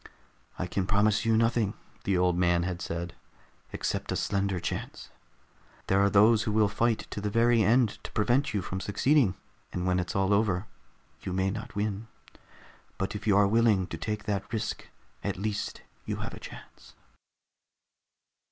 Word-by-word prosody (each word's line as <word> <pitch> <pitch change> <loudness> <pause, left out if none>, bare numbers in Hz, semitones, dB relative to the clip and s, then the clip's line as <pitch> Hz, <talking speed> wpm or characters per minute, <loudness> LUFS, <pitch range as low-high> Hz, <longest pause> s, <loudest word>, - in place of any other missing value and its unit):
"I 95 - -2
can 95 +1 -2
promise 105 +1 +2
you 115 -1 +3
nothing," 115 -2 +1 0.3
the 95 -2 +2
old 90 -1 +2
man 85 -1 +2
had 90 0 -3
said, 85 +1 -4 0.6
"except - - -3
a - - 0
slender 100 -2 0
chance. 85 - -5 0.7
There 95 - +2
are 100 - +4
those 105 +2 +5
who 110 -1 -1
will 105 0 +4
fight 115 +2 0
to 105 - -4
the 105 - -1
very 115 +2 +3
end 115 +1 +2
to - - -7
prevent 125 +6 +1
you 100 -4 -1
from 95 +2 -4
succeeding, 105 +2 +2 0.4
and 90 - -3
when 90 0 +2
it's 90 -1 -3
all 95 +1 +2
over, 100 -2 +1 0.6
you 95 - -4
may 95 +1 +1
not 110 +1 -7
win. 105 +1 -2 0.9
But 95 - -2
if 105 - -6
you 100 -2 +5
are 100 - +6
willing 105 -2 +3
to 85 - -5
take 105 +5 -3
that 100 -3 -3
risk, 110 -2 -3 0.4
at - - -2
least 105 +1 -3 0.2
you - - -1
have - - -5
a - - -8
chance." - - -12
100 Hz, 170 wpm, -28 LUFS, 95-110 Hz, 0.9 s, are